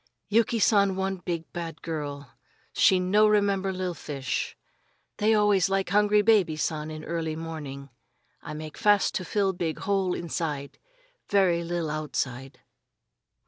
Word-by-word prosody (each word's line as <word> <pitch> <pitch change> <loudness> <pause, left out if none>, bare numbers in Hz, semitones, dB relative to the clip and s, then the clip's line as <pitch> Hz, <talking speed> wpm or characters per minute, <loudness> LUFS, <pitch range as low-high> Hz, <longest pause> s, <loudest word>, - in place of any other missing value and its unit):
"Yuki 230 +2 +2
San 200 -3 +3
one 190 0 -1
big 170 -2 -4
bad 165 -2 -6
girl; 145 -3 -5 0.4
she 190 - +4
no 205 +4 +4
remember 200 -2 +2
li'l 185 -1 -3
fish. 135 -5 -4 0.6
They 220 +1 +3
always 205 -4 +3
like 195 -1 0
hungry 210 +2 +4
baby 205 -7 +4
San 155 0 -2
in 155 0 -7
early 160 -1 -3
morning. 145 -4 -7 0.5
I - - -7
make 155 0 -8
fast 205 -2 +3
to 185 - -2
fill 195 +1 0
big 170 -3 -3
hole 195 -2 0
inside 155 -4 -4 0.5
ve'y 185 -4 +3
li'l 170 -2 -2
outside." 135 -4 -4
175 Hz, 140 wpm, -27 LUFS, 155-200 Hz, 0.6 s, she